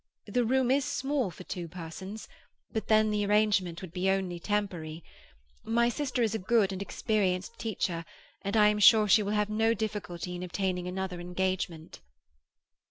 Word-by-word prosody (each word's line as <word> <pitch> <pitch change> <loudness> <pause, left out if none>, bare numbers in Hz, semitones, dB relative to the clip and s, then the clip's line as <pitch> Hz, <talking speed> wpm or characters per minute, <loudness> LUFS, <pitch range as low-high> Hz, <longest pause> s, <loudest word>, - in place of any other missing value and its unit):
The 245 0 +1
room 255 +1 +2
is 275 +1 +3
small 275 -4 -1
for 180 +1 -11
two 175 -2 -5
persons, 180 +5 -8 0.5
but 220 - -2
then 215 0 +4
the 210 -1 +1
arrangement 205 -4 +2
would 175 -3 -9
only 190 -1 0
be - - -10
temporary. 170 -6 -3 0.6
My 235 +1 +2
sister 255 -1 -1
is 220 -2 +1
a 220 - -1
good 200 0 +2
and 190 - -5
experienced 200 0 -1
teacher, 180 -6 -2 0.4
and 200 +3 -1
I 210 -1 +7
am 210 0 0
sure 215 +1 +7
she 210 +2 +6
will 205 0 -2
have 210 0 +1
no 225 +2 +2
difficulty 190 -5 -4
in 175 - -6
obtaining 180 0 -2
another 185 -1 -4
engagement." 180 -2 -3
200 Hz, 165 wpm, -29 LUFS, 180-220 Hz, 0.6 s, I